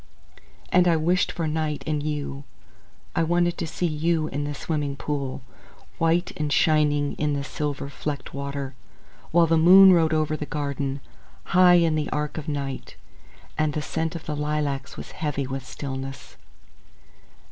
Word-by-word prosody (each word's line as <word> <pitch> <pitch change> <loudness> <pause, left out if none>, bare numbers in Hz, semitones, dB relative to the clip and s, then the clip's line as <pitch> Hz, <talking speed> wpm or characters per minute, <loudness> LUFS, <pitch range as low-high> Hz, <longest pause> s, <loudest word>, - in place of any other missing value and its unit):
And 180 -1 +5
I 170 - +4
wished 175 +3 +1
for 165 - -3
night 155 -1 -2
and 150 -1 -1
you. 145 -2 -4 0.7
I - - +2
wanted 175 +1 +2
to 165 - -2
see 165 +3 -2
you 160 0 0
in 145 +2 -3
the 145 0 -4
swimming 145 -2 -2
pool, 140 -2 -4 0.6
White 165 +2 +2
and 150 -1 -2
shining 145 -2 +3
in 150 -1 +1
the 140 -1 -2
silver 145 0 -3
flecked 145 -1 -5
water. 140 -1 -4 0.6
While 170 +1 +5
the 165 0 +3
moon 190 +3 +9
rode 165 -2 +3
over 155 -1 +1
the 150 -1 -5
garden, 140 -2 -3 0.4
High 180 -1 +6
in 165 -2 +4
the 155 -1 -1
arch 150 +1 -2
of 155 - -9
night, 140 -3 -4 0.6
And 155 -1 +1
the 150 - -2
scent 160 +1 -2
of 165 - -7
the 150 - -3
lilacs 145 -2 -2
was - - -8
heavy 145 -3 -2
with 135 -1 -5
stillness. 135 -1 -6
150 Hz, 160 wpm, -25 LUFS, 140-165 Hz, 0.7 s, moon